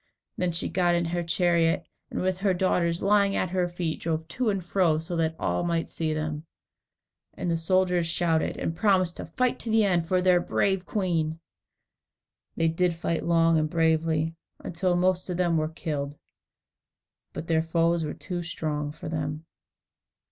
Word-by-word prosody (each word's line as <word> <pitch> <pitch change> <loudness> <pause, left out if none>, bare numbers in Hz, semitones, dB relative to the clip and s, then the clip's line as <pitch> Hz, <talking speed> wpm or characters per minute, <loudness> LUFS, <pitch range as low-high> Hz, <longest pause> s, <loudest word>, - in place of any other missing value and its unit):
Then 180 -1 0
she 165 - -1
got 175 0 +2
into 170 -1 0
her 175 0 0
chariot, 170 0 +2 0.2
and - - -3
with 185 0 0
her 195 -1 +2
daughters 175 -2 +1
lying 200 0 +3
at 180 - -1
her 180 -1 +1
feet, 175 -2 -3
drove 160 -1 -2
to 235 +7 0
and 195 -4 -2
fro, 175 -4 +2
so 165 +2 -4
that 160 -1 0
all 90 - -1
might 170 -1 0
see 160 -1 -2
them. 155 0 -3 0.9
And 175 - -2
the - - +2
soldiers 180 +1 +2
shouted, 165 -1 +1
and 165 - -2
promised 185 -3 +2
to - - -6
fight 250 +9 0
to 230 - -5
the 220 -1 +4
end 175 -4 +1
for 185 +1 +2
their 180 -1 +4
brave 190 +1 0
queen. 165 -6 -1 1.2
They 165 - +2
did 170 +1 +1
fight 165 0 -2
long 165 -1 +3
and 155 0 0
bravely, 160 -1 +1 0.2
until 180 +1 -1
most 185 +1 +1
of 180 - -2
them 175 -2 +2
were 155 -1 +1
killed, 150 -3 -4 1.1
but 160 - -6
their 160 -1 +2
foes 165 +1 +1
were 150 - -4
too 180 -2 -4
strong 155 -3 -3
for 155 - -9
them. 155 0 -3
170 Hz, 175 wpm, -27 LUFS, 160-180 Hz, 1.2 s, the